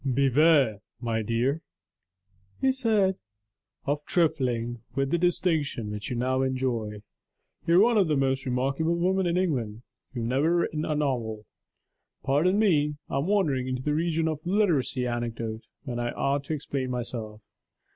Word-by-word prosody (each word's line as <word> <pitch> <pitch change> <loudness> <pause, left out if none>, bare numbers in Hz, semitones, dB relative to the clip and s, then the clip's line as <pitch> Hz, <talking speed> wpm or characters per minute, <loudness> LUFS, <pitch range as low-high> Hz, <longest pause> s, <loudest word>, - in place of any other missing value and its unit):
'Beware, 135 -2 +3 0.2
my 115 -2 -1
dear,' 120 +8 0 1.0
he 265 - +3
said, 215 -7 +2 0.7
'of 145 +1 -1
trifling 125 -8 0
with 135 0 0
the 170 - +3
distinction 160 - 0
which 105 +2 -5
you 125 - -2
now 130 +2 0
enjoy: 120 -6 -2 0.6
you 170 - +4
are 190 - +7
one 230 -1 +4
of 190 - +3
the 150 -2 +1
most 135 0 +1
remarkable 135 +6 0
women 185 +2 +1
in 170 +1 +1
England 120 - -1 0.3
you 120 - -2
have 115 - -2
never 145 +7 +2
written 155 -3 0
a 155 - -1
novel.' 120 -7 -2 0.8
Pardon 160 +8 +2
me; 150 -9 +3 0.2
I 135 - +1
am 145 - -1
wandering 150 -11 +1
into 130 0 -3
the 150 - 0
region 165 +1 0
of 155 -2 -2
literary 175 -10 +1
anecdote, 115 -2 -4 0.2
when 125 -4 -4
I 120 0 -1
ought 140 0 0
to 160 - -3
explain 135 -3 -3
myself. 115 -3 -4
135 Hz, 155 wpm, -27 LUFS, 120-165 Hz, 1.0 s, are